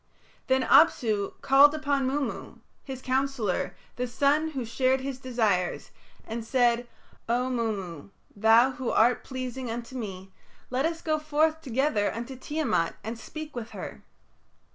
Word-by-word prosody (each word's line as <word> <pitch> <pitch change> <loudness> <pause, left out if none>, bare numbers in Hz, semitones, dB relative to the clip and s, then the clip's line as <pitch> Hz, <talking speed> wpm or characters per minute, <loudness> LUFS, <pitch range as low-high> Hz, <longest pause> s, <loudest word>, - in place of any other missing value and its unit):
Then 260 0 +3
Apsu 220 -11 +3
called 280 +2 +6
upon 285 -3 0
Mummu, 275 -2 -3 0.3
his 265 -2 -7
counsellor, 255 -9 -1 0.2
the 250 0 -1
son 285 +6 +2
who 270 -6 -4
shared 260 +3 +1
his 265 -1 -5
desires, 220 -9 0 0.3
and 225 +1 -5
said, 240 0 +2 0.4
"O 250 +2 +1
Mummu, 200 - -3 0.3
thou 225 +5 +5
who 260 -1 -4
art 240 +3 +3
pleasing 255 -1 -5
unto 235 +2 -6
me, 195 -5 -6 0.4
let 260 +5 +1
us 330 0 -5
go 310 -1 +1
forth 310 +1 +1
together 255 -6 +1
unto 235 +4 -6
Tiamat 260 - -1
and 225 +1 -5
speak 310 +3 -8
with 235 -2 -5
her." - - -7
255 Hz, 140 wpm, -27 LUFS, 225-275 Hz, 0.4 s, called